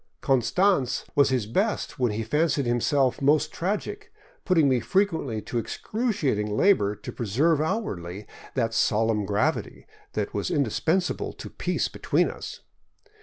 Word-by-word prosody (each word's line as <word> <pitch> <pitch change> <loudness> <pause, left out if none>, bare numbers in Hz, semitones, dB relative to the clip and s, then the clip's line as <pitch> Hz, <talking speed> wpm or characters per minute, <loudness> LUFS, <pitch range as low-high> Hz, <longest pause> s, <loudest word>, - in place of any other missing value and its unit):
Konanz 130 - +2
was 140 - +4
at - - 0
his 120 -5 -1
best 190 - -1
when 125 -3 +2
he 110 +2 -2
fancied 150 +4 +1
himself 125 +3 +1
most 150 +2 +3
tragic, 195 +5 -3 0.3
putting 165 -6 +4
me 130 -2 +3
frequently 160 - 0
to 120 - -2
excruciating 135 - -1
labor 105 - +3
to 105 - -8
preserve 140 +8 +1
outwardly 105 - -3 0.3
that 115 -3 0
solemn 110 -1 +2
gravity 105 +1 -1 0.3
that - - -2
was - - -2
indispensable 160 - 0
to - - -9
peace - - -1
between - - 0
us. - - -8
130 Hz, 135 wpm, -26 LUFS, 110-165 Hz, 0.3 s, was